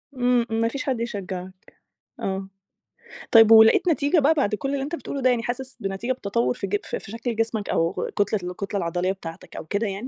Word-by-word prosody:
إمم، 245 -1 +2
إمم. 225 0 0
ما 230 - +3
فيش 260 +3 -4
حد 260 -4 -1
يشجعك، 190 -4 -6 0.5
آه، 190 0 -3 0.8
طيب 225 -1 +7
ولقيت 220 +9 +7
نتيجة 300 +1 +2
بقى 295 +2 +4
بعد 270 -9 +1
كُلّ 270 +6 -4
اللي 280 - -1
أنت 295 +5 -3
بتقوله 280 -4 -5
ده، 255 - +4
يعني 240 -2 +1
حاسس 255 +2 -5
بنتيجة 195 +5 -3
بتتطور 235 0 -1
في 200 -5 -5
ج 205 - +1
ف - - -4
في 200 - -8
شكل 230 0 -3
جسمك 225 -2 -2
أو 165 +1 0
كتلة 205 +1 +1
الكتلة 200 +2 -4
العضلية 175 +1 -1
بتاعتك 165 -4 -9
أو - - -6
كده 200 +7 -1
يعني؟ 200 +5 -5
225 Hz, 210 wpm, -24 LUFS, 195-250 Hz, 0.8 s, طيب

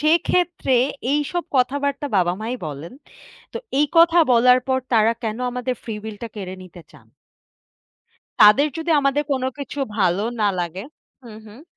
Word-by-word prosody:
সেক্ষেত্রে 340 0 +1 0.4
এইসব 295 +4 -1
কথাবার্তা 280 +3 0
বাবা-মাই 190 +6 -1
বলেন। 150 - -8 0.6
তো - - -6 0.2
এই 300 - +3
কথা 335 +1 +6
বলার 250 +1 +5
পর 260 0 +2
তারা 225 0 +4
কেন 220 0 -3
আমাদের 250 +1 -3
ফ্রি 225 - -6
উইল 220 -1 -7
টা 235 - -4
কেড়ে 190 -3 -6
নিতে 175 -1 -14
চান? - - -19 1.3
তাদের 215 +7 +7
যদি 325 +1 -4
আমাদের 275 +1 +1
কোনো 260 -1 -1
কিছু 285 0 -7 0.2
ভালো 190 0 +1 0.2
না 210 - +3
লাগে 175 +2 -5 0.4
হুম, 220 -2 -11
হুম। 215 +6 -14
250 Hz, 150 wpm, -21 LUFS, 210-285 Hz, 1.3 s, তাদের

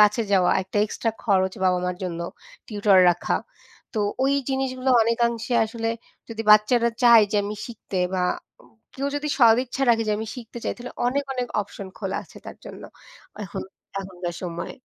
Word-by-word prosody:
কাছে 210 +2 +5
যাওয়া 185 -2 +4
একটা 190 - -7
এক্সট্রা 225 +1 -2
খরচ 190 -3 +2
বাবা-মার 180 -1 +1
জন্য 170 -2 -4 0.5
টিউটর 205 -3 +3
রাখা। 175 - -1 0.6
তো 215 - 0 0.2
ওই 275 - +3 0.2
জিনিসগুলো 265 -1 -1
অনেকাংশে 235 +1 0
আসলে 225 +1 -3 0.4
যদি 225 -1 -5
বাচ্চারা 220 +3 +5
চায় 235 -3 +8
যে 210 - +2
আমি 205 +1 -4
শিখতে 215 -5 -6 0.2
বা 180 -1 +1 0.4
উম 125 - -22 0.2
কেউ 275 +1 -2
যদি 295 +1 -3
সদিচ্ছা 245 +2 +4
রাখে 230 -1 +4
যে 210 - +2
আমি 220 - -4
শিখতে 240 -1 -9
চাই - - 0
তাহলে 245 +1 -8
অনেক, 280 +3 0
অনেক 250 -1 -2
অপশন 200 -1 -8
খোলা 195 -2 -3
আছে - - -18
তার - - -8
জন্য - - -10 0.6
এখন 185 - -6 0.4
এখনকার 180 -2 -6
সময়ে। 170 -2 -5
220 Hz, 165 wpm, -24 LUFS, 190-240 Hz, 0.6 s, চায়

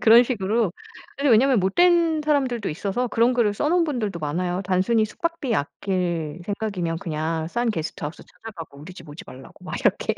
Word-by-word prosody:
그런 230 +1 +8
식으로. 220 -4 0 0.4
근데 280 0 +2
왜냐하면 240 +1 +5
못된 330 - +3
사람들도 260 -8 +1
있어서 200 +10 -2
그런 235 +2 +3
글을 220 -4 +2
써 295 - 0
놓은 345 +1 +3
분들도 230 - -2
많아요. 175 +4 -2
"단순히 190 +5 +2
숙박비 290 +1 -2
아낄 170 +1 -2
생각이면 190 -5 -2
그냥 160 -1 -2
싼 235 +5 0
게스트하우스 160 -4 -5
찾아가고 175 -10 -11
우리 165 +5 -10
집 170 -3 -13
오지 145 +3 -9
말라."고 130 +1 -13
막 - - -4
이렇게. - - +1
205 Hz, 415 characters per minute, -23 LUFS, 170-245 Hz, 0.4 s, 그런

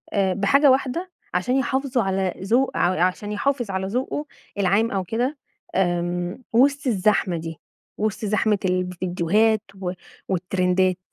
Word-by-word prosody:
بحاجة 200 +9 +4
واحدة، 275 +8 0 0.2
عشان 250 +1 +1
يحافظوا 265 -2 0
على 190 -1 0
ذو 240 +7 +2
ع 175 -1 +2
عشان 205 +3 -1
يحافظ 240 -1 -1
على 190 0 -2
ذوقه 260 +7 -2 0.3
العام 200 +4 +2
أو 195 -2 -1
كده، 245 - -1 0.4
آمم، 175 +3 -1
وسط 280 +3 +3
الزحمة 200 -4 +2
دي، 160 0 -7 0.4
وسط 215 0 -2
زحمة 210 0 +2
الفيديوهات 185 +4 +1 0.2
و 180 -1 -1 0.4
والترندات؟ 185 0 +1
200 Hz, 125 wpm, -23 LUFS, 185-245 Hz, 0.4 s, بحاجة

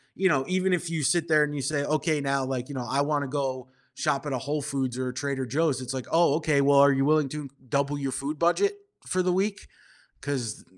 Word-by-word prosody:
you 190 0 +2
know, 135 -5 +2
even 185 0 +1
if 175 -1 -1
you 160 -2 -2
sit 165 +5 +2
there 155 -1 +5
and 150 0 -2
you 140 - -2
say, 145 +1 -1
"Okay, 155 0 0
now, 135 -1 0
like, 130 -1 -3
you 140 - -6
know, 125 -2 -4
I 140 +1 +1
wanna 145 -1 0
go 130 -2 -3 0.3
shop 140 - -1
at 145 - -2
a - - 0
Whole 145 +4 -2
Foods 130 -3 -2
or 130 0 -2
a - - -6
Trader 135 0 -2
Joe's," 140 +1 0
it's 130 +1 -5
like, 130 -2 -4
"Oh, 165 -3 +4
okay, 155 -3 +2
well, 140 0 +5
are 140 0 +7
you 135 0 +1
willing 155 -1 +3
to 150 0 -6 0.2
double 140 +3 0
your 135 -1 -2
food 140 +4 -3
budget 400 - +2 0.3
for 185 - 0
the 180 0 +1
week?" 195 +2 -1 0.5
'Cause 130 -6 -4
140 Hz, 245 wpm, -26 LUFS, 135-155 Hz, 0.5 s, are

